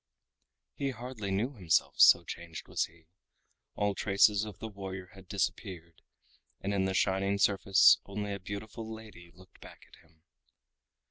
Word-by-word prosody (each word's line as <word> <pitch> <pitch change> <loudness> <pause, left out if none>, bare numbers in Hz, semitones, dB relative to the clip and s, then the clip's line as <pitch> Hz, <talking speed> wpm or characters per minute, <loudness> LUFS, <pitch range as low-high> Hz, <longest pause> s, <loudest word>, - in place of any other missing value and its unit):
He 140 - -2
hardly 120 -4 -6
knew 105 +8 -1
himself, 90 -9 +1
so 85 - +8
changed 85 -1 -8
was - - 0
he. 85 0 -21 0.7
All 105 0 0
traces 100 +1 +3
of 105 -4 -9
the 110 - -6
warrior 95 -3 -8
had 95 -2 -15
disappeared, 95 -4 -4 0.6
and 100 +1 -3
in 95 -1 +1
the 95 0 -1
shining 100 +1 +1
surface 100 -1 +5
only 105 0 -4
a 100 - -5
beautiful 110 +4 -7
lady 110 -6 -11
looked 95 0 -19
back - - -13
at - - -20
him. 80 -1 -28
100 Hz, 150 wpm, -31 LUFS, 90-105 Hz, 0.7 s, so